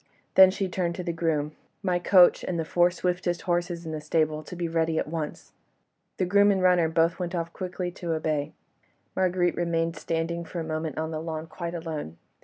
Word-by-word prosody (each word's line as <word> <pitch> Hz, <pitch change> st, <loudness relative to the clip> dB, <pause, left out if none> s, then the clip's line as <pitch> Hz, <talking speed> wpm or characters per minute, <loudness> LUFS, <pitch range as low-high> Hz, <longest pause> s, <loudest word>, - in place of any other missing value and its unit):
Then 190 Hz, 0 st, +9 dB
she 195 Hz, 0 st, -2 dB
turned 175 Hz, -1 st, -2 dB
to 180 Hz, -, -5 dB
the 170 Hz, -1 st, -2 dB
groom: 160 Hz, -3 st, 0 dB, 0.3 s
"My 180 Hz, -2 st, +1 dB
coach 180 Hz, 0 st, +5 dB
and 175 Hz, -, -2 dB
the 165 Hz, -, -1 dB
four 175 Hz, +2 st, +3 dB
swiftest 180 Hz, -1 st, -2 dB
horses 175 Hz, -1 st, -1 dB
in 160 Hz, -, -4 dB
the 155 Hz, -1 st, -4 dB
stables, 155 Hz, 0 st, 0 dB
to -, -, -7 dB
be 175 Hz, -1 st, -2 dB
ready 165 Hz, -1 st, 0 dB
at -, -, 0 dB
once." 155 Hz, -1 st, -5 dB, 0.7 s
The 185 Hz, -, +1 dB
groom 200 Hz, +3 st, +5 dB
and 195 Hz, -2 st, +2 dB
runner 180 Hz, -3 st, +4 dB
both 165 Hz, +2 st, +2 dB
went 180 Hz, 0 st, -3 dB, 0.2 s
quickly 180 Hz, -1 st, -4 dB
off -, -, -24 dB
to 170 Hz, -2 st, -2 dB
obey. 155 Hz, -2 st, -1 dB, 0.6 s
Marguerite 180 Hz, -1 st, +2 dB
remained 165 Hz, -1 st, 0 dB
standing 165 Hz, +2 st, -2 dB
for 170 Hz, +1 st, -6 dB
a -, -, -2 dB
moment 155 Hz, -1 st, -3 dB
on 160 Hz, 0 st, -2 dB
the 155 Hz, -1 st, -3 dB
lawn 160 Hz, -1 st, -4 dB
quite 170 Hz, +1 st, -6 dB
alone. 155 Hz, -, -5 dB
170 Hz, 205 wpm, -27 LUFS, 160-180 Hz, 0.7 s, Then